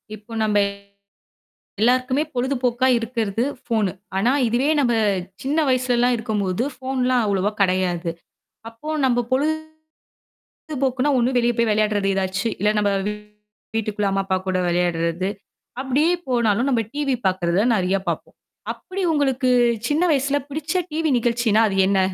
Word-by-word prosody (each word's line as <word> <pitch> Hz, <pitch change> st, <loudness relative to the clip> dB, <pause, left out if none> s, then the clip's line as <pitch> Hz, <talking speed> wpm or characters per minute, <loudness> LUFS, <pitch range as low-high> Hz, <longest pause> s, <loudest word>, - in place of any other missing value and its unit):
இப்போ 215 Hz, +2 st, -17 dB
நம்ப 210 Hz, -1 st, +1 dB, 1.2 s
எல்லாருக்குமே 255 Hz, +4 st, +2 dB
பொழுதுபோக்கா 250 Hz, 0 st, +1 dB
இருக்குறது 230 Hz, -2 st, -2 dB, 0.2 s
ஃபோனு. 215 Hz, -6 st, 0 dB, 0.2 s
ஆனா, 225 Hz, +6 st, +2 dB, 0.2 s
இதுவே 245 Hz, +5 st, +1 dB
நம்ம 240 Hz, -4 st, +2 dB, 0.5 s
சின்ன 285 Hz, +4 st, -1 dB
வயசுல 255 Hz, -1 st, +2 dB
எல்லாம் 245 Hz, +1 st, +3 dB
இருக்கும்போது 215 Hz, -2 st, -1 dB
ஃபோன்லாம் 255 Hz, -1 st, 0 dB
அவ்வளவா 200 Hz, 0 st, +1 dB
கிடையாது. 180 Hz, -2 st, +1 dB, 0.6 s
அப்போ 230 Hz, +6 st, -13 dB, 0.2 s
நம்ம 245 Hz, -2 st, +2 dB, 1.3 s
பொழுதுபோக்குன்னா 275 Hz, -1 st, -2 dB
ஒண்ணு 250 Hz, +1 st, +1 dB
வெளிய 240 Hz, 0 st, +2 dB
போய் 235 Hz, -1 st, +2 dB
விளையாடுறது 210 Hz, -2 st, +1 dB
ஏதாச்சு. 190 Hz, +3 st, -1 dB
இல்ல 210 Hz, +2 st, +3 dB
நம்ம 205 Hz, -1 st, +2 dB, 0.9 s
வீட்டுக்குள்ள 210 Hz, -2 st, -1 dB
அம்மா, 195 Hz, 0 st, 0 dB
அப்பா 190 Hz, -1 st, +1 dB
கூட 185 Hz, -1 st, +1 dB
விளையாடுறது. 175 Hz, +1 st, 0 dB, 0.5 s
அப்பிடியே 275 Hz, +5 st, +2 dB, 0.2 s
போனாலும் 235 Hz, 0 st, +1 dB
நம்ம 240 Hz, -4 st, +2 dB
டிவி 285 Hz, -2 st, 0 dB
பாக்குறத 185 Hz, 0 st, +1 dB
நிறைய 190 Hz, 0 st, +1 dB
பாப்போம். 170 Hz, -2 st, -4 dB, 0.4 s
அப்பிடி 380 Hz, +1 st, -7 dB
உங்களுக்குச் 250 Hz, -5 st, +2 dB
சின்ன 300 Hz, +4 st, +2 dB
வயசுல 280 Hz, 0 st, +1 dB
பிடிச்ச 310 Hz, +2 st, -3 dB, 0.2 s
டிவி 315 Hz, +1 st, 0 dB
நிகழ்ச்சின்னா, 235 Hz, -2 st, +2 dB
அது 195 Hz, -, -2 dB
என்ன? 195 Hz, 0 st, +2 dB
235 Hz, 125 wpm, -22 LUFS, 200-260 Hz, 1.3 s, எல்லாம்